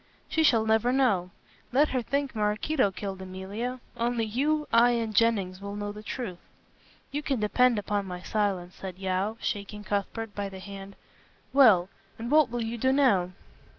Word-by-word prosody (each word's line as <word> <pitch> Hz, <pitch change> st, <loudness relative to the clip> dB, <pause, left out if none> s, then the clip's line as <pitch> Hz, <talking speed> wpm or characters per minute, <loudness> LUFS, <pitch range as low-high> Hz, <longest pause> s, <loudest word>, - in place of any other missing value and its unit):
"She 320 Hz, -, 0 dB
shall 230 Hz, -8 st, +4 dB
never 220 Hz, +2 st, +3 dB
know. 235 Hz, -10 st, +2 dB, 0.4 s
Let 285 Hz, +4 st, +4 dB
her 255 Hz, -, 0 dB
think 275 Hz, +2 st, -2 dB
Maraquito 215 Hz, +4 st, +1 dB
killed 195 Hz, 0 st, -6 dB
Emilia. 195 Hz, +7 st, -5 dB, 0.2 s
Only 235 Hz, -1 st, 0 dB
you, 295 Hz, +7 st, 0 dB
I 240 Hz, +1 st, +6 dB
and 225 Hz, -2 st, -1 dB
Jennings 195 Hz, -4 st, +2 dB
will 200 Hz, 0 st, -6 dB
know 205 Hz, 0 st, -4 dB
the 210 Hz, +1 st, -9 dB
truth." 215 Hz, -5 st, -5 dB, 0.7 s
"You 290 Hz, +2 st, -2 dB
can 275 Hz, -4 st, -1 dB
depend 240 Hz, +3 st, +3 dB
upon 205 Hz, -1 st, -1 dB
my 180 Hz, 0 st, -6 dB
silence," 195 Hz, -4 st, -1 dB
said 185 Hz, -2 st, -8 dB
Yeo, 190 Hz, +3 st, -1 dB
shaking 210 Hz, 0 st, -4 dB
Cuthbert 205 Hz, +2 st, -3 dB
by 200 Hz, 0 st, -3 dB
the 190 Hz, -, -9 dB
hand; 195 Hz, 0 st, -9 dB, 0.6 s
"well, 220 Hz, -11 st, +6 dB, 0.3 s
and 235 Hz, +3 st, -5 dB
what 305 Hz, -3 st, +5 dB
will 240 Hz, 0 st, -2 dB
you 230 Hz, +1 st, -4 dB
do 260 Hz, +3 st, +3 dB
now?" 200 Hz, -10 st, +3 dB
215 Hz, 170 wpm, -28 LUFS, 195-245 Hz, 0.7 s, I